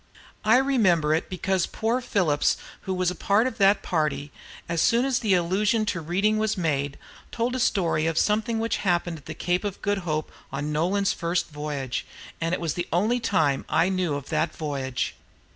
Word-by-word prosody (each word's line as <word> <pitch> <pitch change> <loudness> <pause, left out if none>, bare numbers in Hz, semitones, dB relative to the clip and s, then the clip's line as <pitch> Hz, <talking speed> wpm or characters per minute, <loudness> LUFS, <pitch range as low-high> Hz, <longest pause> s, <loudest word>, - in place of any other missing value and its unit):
I 220 +3 +5
remember 200 - +3
it, 160 - -1
because 185 0 0
poor 230 +3 -1
Phillips, 170 -11 +1 0.3
who - - +1
was 180 -1 +1
of 180 - -9
the 205 -1 +3
party, 150 -4 -1 0.4
as 170 -1 0
soon 240 +2 +3
as 265 -2 +1
the 210 -5 +2
allusion 200 +5 +1
to 175 -5 -2
reading 195 +7 +1
was 215 -1 0
made, 145 -5 -1 0.3
told 240 +2 -1
a - - -1
story 170 -8 +1
of 165 -1 -1
something 220 +4 +1
which 225 +1 0
happened 175 -3 0
at 140 - -22
the 160 - -6
Cape 180 +3 0
of 205 -2 -4
Good 205 0 +1
Hope 155 -4 -3 0.2
on 145 +2 -3
Nolan's 190 +6 +1
first 170 -1 -1
voyage; 145 -4 -4 0.3
and 165 +2 +1
it 175 - -6
is 160 -3 0
the 175 - -3
only 215 +8 +2
thing 160 - +1
I 165 - +3
ever 190 - 0
knew 180 -5 0
of 140 -1 -6
that 160 -1 0
voyage. 135 -5 -3
180 Hz, 190 wpm, -25 LUFS, 155-210 Hz, 0.4 s, I